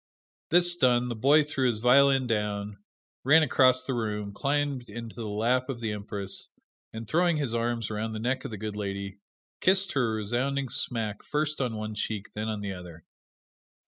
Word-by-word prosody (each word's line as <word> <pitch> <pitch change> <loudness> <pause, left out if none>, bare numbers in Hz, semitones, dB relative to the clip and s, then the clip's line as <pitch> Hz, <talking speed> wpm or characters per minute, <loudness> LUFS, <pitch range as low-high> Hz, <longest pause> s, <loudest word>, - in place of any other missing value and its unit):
This 175 +1 +4
done, 125 -5 +2
the 120 - -3
boy 140 +7 +5
threw 135 -3 0
his 115 - -1
violin 135 +3 +5
down, 105 -3 -2 0.4
ran 155 +5 +6
across 130 -2 +4
the 130 - -3
room, 105 -3 -3
climbed 140 -1 -1
into 115 -1 -8
the 115 -2 -5
lap 120 +5 0
of 130 -3 -4
the 115 -2 -2
Empress 100 -1 -4 0.4
and 110 0 -7
throwing 170 +5 +2
his 140 -6 -1
arms 115 -1 -1
around 110 +1 -3
the 110 - -4
neck 125 +4 -1
of - - -5
the 110 - -6
good 105 0 -5
lady, 100 -1 -5 0.4
kissed 190 0 +4
her 125 -5 +1
a - - -1
resounding 125 +6 -1
smack 110 -4 -1
first 150 0 -2
on 120 -4 -1
one 110 0 -4
cheek, 105 -1 -4
then 105 +1 -3
on 105 -1 -3
the 100 -1 -4
other. 85 -3 -11
115 Hz, 185 wpm, -28 LUFS, 105-135 Hz, 0.4 s, ran